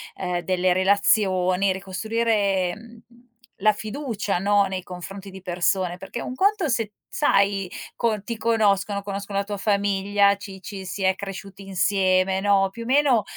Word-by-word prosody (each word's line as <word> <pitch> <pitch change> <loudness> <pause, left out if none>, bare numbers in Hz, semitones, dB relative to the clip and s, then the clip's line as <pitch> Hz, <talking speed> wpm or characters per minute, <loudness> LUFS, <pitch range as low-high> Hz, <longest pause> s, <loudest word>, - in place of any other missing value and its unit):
ehm, 180 -1 -2
delle 185 +1 +1
relazioni, 190 -1 +3
ricostruire, 195 -1 0
mhmm, 230 +1 -14 0.6
la 215 +1 +5
fiducia, 215 -4 -3
no, 200 +1 +3
nei 190 -1 -4
confronti 195 +2 -8
di 190 0 -10
persone, 180 0 0
perché 195 +5 -7
un 255 - -5
conto 400 +2 +2
è 300 - -1
se 225 -3 0 0.2
sai 200 -8 +2 0.3
co 220 -3 0
ti 230 +3 -5
conoscono, 205 -3 +1
conoscono 200 0 -4
la - - 0
tua 205 0 -5
famiglia, 200 0 +2
ci 195 -1 -10
ci 195 -1 -7
si 195 - -5
è 190 0 +3
cresciuti 195 0 -8
insieme, 190 0 +2
no, 195 -1 +3
più 230 +4 -8
o - - -9
meno, 260 -4 +3
200 Hz, 155 wpm, -24 LUFS, 190-215 Hz, 0.6 s, la